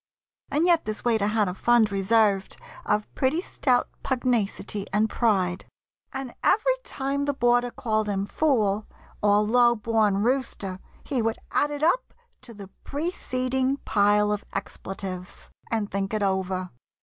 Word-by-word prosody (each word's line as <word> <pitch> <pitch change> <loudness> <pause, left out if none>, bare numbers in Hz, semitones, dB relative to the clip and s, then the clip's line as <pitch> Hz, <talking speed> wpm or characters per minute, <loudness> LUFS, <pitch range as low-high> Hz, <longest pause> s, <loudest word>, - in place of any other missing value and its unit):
And 310 +4 +1
yet 340 -2 +4
this 215 +2 -4
waiter 220 -4 +2
had 210 -1 +1
a 180 - -2
fund 230 +1 +3
reserved 200 0 +2 0.3
Of 210 0 0
pretty 270 +5 +1
stout 255 -8 +1
pugnacity 225 -5 -1
and 210 +2 +2
pride, 190 -6 +1 0.5
And 270 -3 -5
every - - +3
time 275 +1 -2
the 285 -1 -1
boarder 245 0 +3
called 215 -5 -1
him 195 -1 -1
"fool," 215 -6 +1 0.3
Or 205 0 +4
"low 240 +2 +4
born 215 -2 +1
rooster," 235 -7 -1 0.2
he 265 -4 -1
would 225 0 0
add 290 - +2
it 295 0 -4
up 365 +10 +1 0.3
To 235 - -12
the 200 -2 -10
preceding 265 -4 -1
pile 210 0 +3
of 210 -1 -2
expletives, 190 -2 -6 0.2
And 220 -3 -1
think 195 +2 -2
it 210 - 0
over. 190 -1 -1
220 Hz, 145 wpm, -25 LUFS, 200-260 Hz, 0.5 s, yet